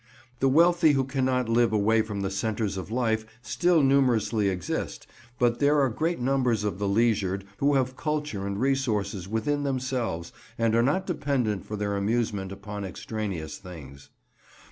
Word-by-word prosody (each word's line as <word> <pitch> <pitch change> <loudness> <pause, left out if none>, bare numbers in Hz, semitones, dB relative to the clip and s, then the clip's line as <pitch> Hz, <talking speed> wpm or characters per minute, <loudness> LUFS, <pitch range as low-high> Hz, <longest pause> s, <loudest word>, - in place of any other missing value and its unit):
The 135 - +3
wealthy 170 +2 +5
who 135 -1 +2
cannot 130 -2 0
live 115 0 +3
away 110 +1 +3
from 105 -2 -4
the 95 - -2
centres 105 +1 -1
of 95 +1 -6
life 110 -2 0 0.2
still 175 0 +2
numerously 115 -6 +3
exist, 90 -2 -4 0.3
but 120 -1 +2
there 145 +1 +4
are 135 -2 +3
great 160 +8 -1
numbers 125 -4 +1
of 100 -3 -2
the 100 - 0
leisured 100 -3 +1
who 140 +1 +2
have 130 -1 0
culture 150 -11 -2
and 100 0 -3
resources 110 -8 0
within 110 +8 -1
themselves 130 -11 -2 0.2
and 115 -1 +1
are 115 - +4
not 145 +10 +1
dependent 135 - -1
for 105 - -4
their 100 -1 -2
amusement 100 -2 -1
upon 100 +1 -6
extraneous 95 -4 -5
things. 70 -7 -11
115 Hz, 160 wpm, -27 LUFS, 100-135 Hz, 0.3 s, wealthy